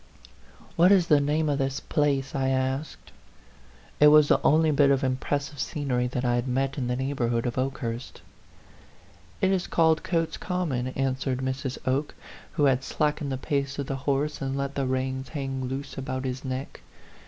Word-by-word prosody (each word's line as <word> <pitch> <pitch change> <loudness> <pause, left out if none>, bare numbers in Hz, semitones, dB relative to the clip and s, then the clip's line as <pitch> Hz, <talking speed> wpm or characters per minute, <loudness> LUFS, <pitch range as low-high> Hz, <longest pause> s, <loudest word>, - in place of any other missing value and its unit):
" - - -24
What 175 +3 +6
is 190 -4 +5
the 150 -2 +5
name 150 +2 +1
of 145 -1 0
this 135 0 -1
place?" 140 -3 0
I 135 -1 0
asked. 130 +3 -2 0.9
It 150 - +8
was 150 0 +7
the - - +4
only 155 +1 +4
bit 140 -1 +4
of 140 -1 +2
impressive 140 +2 -2
scenery 130 -5 -1
that 125 +1 -3
I 120 - +2
had 120 +1 0
met 135 +1 0
in 125 - -2
the 125 - 0
neighborhood 125 -3 -1
of 120 - -2
Oke 135 +1 -1
hurst. 115 0 -6 0.6
" 85 0 -27
It 190 - +4
is 190 -2 0
called 160 -2 +3
Cotes 165 -2 -1
Common," 160 -9 -2
answered 130 0 -1
Mrs. 130 0 -3
Oke, 135 +3 -1 0.4
who 150 - 0
had 135 -2 +3
slackened 150 0 -1
the 130 - -1
pace 140 0 -2
of 140 - -2
the 135 - -3
horse 145 +2 0
and 135 0 -2
let 140 0 -2
the 140 -2 -1
reins 130 0 -2
hang 135 -3 -3
loose 135 +2 -5
about 130 0 -4
his 130 0 -4
neck. 130 +1 -5
135 Hz, 190 wpm, -26 LUFS, 130-145 Hz, 0.9 s, It